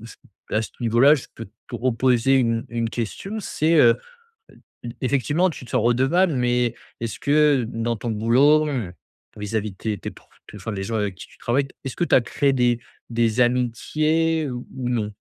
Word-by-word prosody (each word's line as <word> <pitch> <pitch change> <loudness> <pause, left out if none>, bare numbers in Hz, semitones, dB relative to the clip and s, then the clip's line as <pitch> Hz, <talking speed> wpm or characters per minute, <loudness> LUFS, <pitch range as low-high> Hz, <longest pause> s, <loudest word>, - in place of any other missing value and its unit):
je 115 +1 -11 0.4
à 110 - +2
ce - - -7
niveau-là, 120 +5 +5
je 140 - -5
peux 115 - -7 0.2
te - - -5
reposer 125 +1 +2
une 115 -2 +1
une 115 -1 -1
question, 195 - -4
c'est, 165 -4 0
heu, 120 -5 +7 0.6
e - - -20 0.3
ef 120 - -6
effectivement 140 - +1
tu 140 - -9
te - - -13
sens - - +1
redevable, 135 +9 +3
mais 120 -1 +1 0.3
est-ce 115 -2 -4
que, 145 -2 +3
heu, - - -3
dans 115 +1 -2
ton 115 +2 -4
boulot, 135 +8 +4
heu, 115 -11 -3 0.4
vis-à-vis 105 0 -3
de 95 - -18
tes 110 0 -3
tes - - -6
pr - - -18 0.3
enfin 105 +3 -6
les 95 -2 -4
gens 115 +4 -3
avec 105 -3 -1
qui - - -11
tu - - -21
travailles, 135 +4 0 0.2
est-ce 135 - -5
que 175 - 0
tu - - +3
as - - +6
créé 140 +3 0
des 120 -2 +2 0.3
des 115 0 +1
amitiés 155 +6 +1
ou 125 0 -6
ou 125 -2 -2
non? 110 -4 -1
120 Hz, 200 wpm, -23 LUFS, 115-140 Hz, 0.6 s, heu